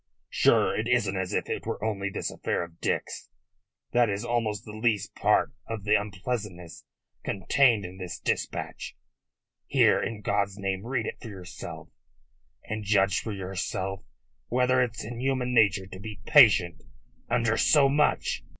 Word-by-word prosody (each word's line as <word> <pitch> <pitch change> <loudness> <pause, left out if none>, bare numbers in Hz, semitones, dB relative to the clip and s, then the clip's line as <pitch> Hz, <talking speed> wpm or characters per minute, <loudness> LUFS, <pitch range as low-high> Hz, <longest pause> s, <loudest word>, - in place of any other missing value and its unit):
Sure, - - +3
it 110 - -2
isn't 120 -6 +1
as 95 -1 -2
if - - -1
it - - -4
were - - -4
only 100 -3 -1
this - - -3
affair - - -2
of 85 0 -12
Dick's. - - -2 0.6
That 120 -1 +3
is 100 +3 -3
almost 115 -3 -1
the 105 - -8
least 110 -2 -1
part - - +2
of 115 -3 -5
the 105 +1 +2
unpleasantness 100 -3 -3 0.4
contained 110 +2 +2
in 90 +1 -9
this 90 -2 -5
dispatch. - - -3 0.7
Here! - - +4
In 110 -2 -4
God's 100 -1 0
name, 95 +1 -3
read 135 +1 -1
it - - -6
for 115 - -8
yourself, 90 -3 -9 0.7
and 110 0 -5
judge 100 -2 +2
for 110 - -5
yourself 95 0 -4 0.5
whether 125 +1 +2
it's 115 -4 -2
in 115 +2 -6
human 130 -1 -1
nature 105 -4 +4
to 95 0 -10
be 105 0 -8
patient 105 - +6 0.5
under 115 -1 +2
so 140 +3 +5
much." 150 +2 +1
105 Hz, 155 wpm, -27 LUFS, 95-120 Hz, 0.7 s, patient